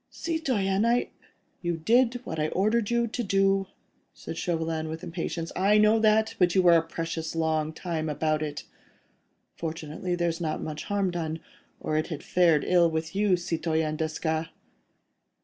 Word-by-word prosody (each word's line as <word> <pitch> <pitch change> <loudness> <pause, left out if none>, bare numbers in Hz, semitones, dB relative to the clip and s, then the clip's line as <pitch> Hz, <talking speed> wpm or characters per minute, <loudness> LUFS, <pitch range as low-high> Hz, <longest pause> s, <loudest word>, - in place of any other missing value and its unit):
"Citoyen... 230 - -1
I.. 235 +1 +1 0.2
." - - -43
"You 175 -2 -1
did 240 +7 +2
what 160 -8 -5
I 155 - +1
ordered 210 +5 +1
you 235 0 +2
to 235 +2 -3
do," 195 -1 +2 0.5
said - - -7
Chauvelin, 165 -2 -2
with 160 +1 -6
impatience. 165 -1 -4
"I 200 +3 +4
know 215 +1 +5
that, 220 0 +3
but 180 -1 +3
you 190 - +4
were 175 -1 +7
a 165 - +5
precious 165 0 -4
long 160 -1 0
time 160 -1 -3
about 155 +1 0
it. 150 -1 -4 0.9
Fortunately, 165 +2 -4
there's 170 -1 -1
not 155 -2 -2
much 155 -1 -5
harm 200 -3 0
done, 165 -2 -3 0.4
or 155 - -1
it 155 - 0
had 155 -4 -6
fared 170 -4 +3
ill 175 -2 +4
with 160 +2 -3
you, 200 -2 +3
Citoyen 160 -2 -1
Desgas." 160 +1 -2
170 Hz, 165 wpm, -27 LUFS, 160-195 Hz, 0.9 s, were